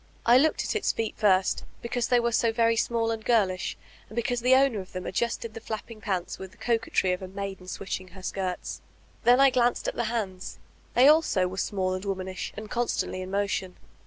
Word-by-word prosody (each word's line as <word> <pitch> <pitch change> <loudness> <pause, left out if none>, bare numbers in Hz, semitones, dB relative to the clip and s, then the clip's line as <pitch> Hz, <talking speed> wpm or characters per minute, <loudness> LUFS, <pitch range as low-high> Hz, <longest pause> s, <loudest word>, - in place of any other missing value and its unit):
I 240 +2 +7
looked 315 +3 +2
at - - -2
its 435 - +1
feet 225 -1 -3
first, 190 -3 +2 0.2
because 235 0 -1
they 245 - +4
were 235 0 +1
so 230 0 +2
very 230 0 +3
small 230 0 +1
and 225 -1 -4
girlish, 195 -7 +1 0.3
and 215 - -11
because 240 0 0
the 255 +2 +5
owner 265 -5 +3
of 185 - -9
them 185 0 -5
adjusted 235 -1 -2
the 225 - -8
flapping 220 0 -6
pants 185 -4 -3
with 190 - -7
the 190 - -22
coquetry 225 -5 +1
of 180 - -4
a 190 - -5
maiden 195 -1 -6
switdi* 190 +1 -4
ing 185 - -13
her 185 0 -13
skirts. 185 -1 -3 0.4
Then 245 +2 +6
I 275 -1 +7
glanced 245 -1 +1
at - - -1
the 235 - -1
hands: 205 -5 -3 0.4
they 250 +3 +7
also 295 - +4
were 185 +1 -7
small 190 -2 -1
and 185 0 -4
womanish, 190 -2 -4
and 215 0 -6
constantly 235 -5 -1
in 185 - -6
motion. 195 -2 -2
215 Hz, 215 wpm, -27 LUFS, 190-235 Hz, 0.4 s, I